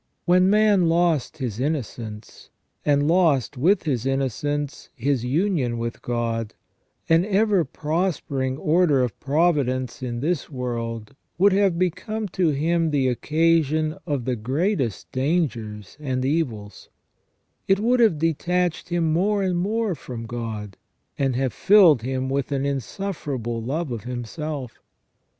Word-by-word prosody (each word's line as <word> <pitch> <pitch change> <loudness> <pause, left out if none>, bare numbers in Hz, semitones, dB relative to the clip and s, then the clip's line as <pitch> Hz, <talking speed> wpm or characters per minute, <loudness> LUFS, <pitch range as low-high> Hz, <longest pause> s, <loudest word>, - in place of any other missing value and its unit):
When 180 +1 +4
man 205 -4 +4
lost 165 -3 +1
his 120 -6 -4
innocence, 120 -7 -4 0.3
and 145 0 +2
lost, 160 -7 +2
with 175 +11 +2
his 130 -8 -1
innocence, 140 +2 -2
his 130 -1 0
union 140 -3 0
with 115 0 -4
God, 115 -2 -2 0.5
an 165 +1 +4
ever 205 -2 +2
prospering 150 -4 -2
order 155 -4 +3
of 120 -5 -4
providence 135 -5 0
in 120 -2 -3
this 155 +2 -1
world 115 -4 -4 0.2
would 195 +2 +5
have 195 -3 +2
become 210 +5 -2
to 180 0 +1
him 165 +3 +1
the 135 -3 +2
occasion 155 +2 +1
of 140 -6 -2
the 130 -1 0
greatest 130 - -1
dangers 125 - -2
and 130 -3 -2
evils; 120 - -2 0.8
it 195 0 +3
would 245 +4 +2
have 220 -9 +4
detached 170 +2 0
him 165 -2 +1
more 200 +4 +1
and 180 -2 0
more 215 +2 0
from 125 -6 -7
God, 110 -4 -5 0.4
and 135 -3 +1
have 130 0 0
filled 185 - +6
him 130 +2 -2
with 140 +1 -2
an 140 -1 0
insufferable 140 - -3
love 145 +5 -3
of 115 -2 -5
himself. 125 +2 -5
145 Hz, 130 wpm, -23 LUFS, 125-175 Hz, 0.8 s, filled